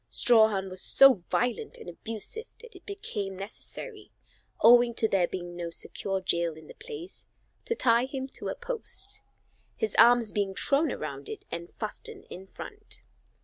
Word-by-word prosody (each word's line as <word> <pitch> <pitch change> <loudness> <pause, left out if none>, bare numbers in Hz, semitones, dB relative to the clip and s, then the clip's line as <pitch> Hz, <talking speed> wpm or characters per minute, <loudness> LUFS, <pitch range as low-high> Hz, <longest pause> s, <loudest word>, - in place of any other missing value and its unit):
Strawhan 220 -5 +5
was 185 0 -4
so 275 -1 +7 0.2
violent 425 - -1
and 455 - -12
abusive 230 - -4
that 475 0 -13
it - - -15
became 210 - -4
necessary, 410 - -8 0.5
owing 240 0 +7
to 220 - +3
there 190 -4 +2
being 175 -1 -6
no 170 -1 -4
secure 195 +3 -3
jail 170 -3 0
in 160 0 -13
the - - -12
place, 445 -6 -9 0.4
to 460 - -1
tie 235 - +3
him 265 0 -5
to - - -6
a - - -3
post, 475 -5 -2 0.6
his 445 - -1
arms 240 -3 +6
being 200 -2 -1
thrown 285 +8 +2
around - - -6
it 440 - -7
and 170 0 -6
fastened 215 -2 -6
in 190 +2 -9
front. 415 - -3
235 Hz, 160 wpm, -28 LUFS, -, 0.6 s, so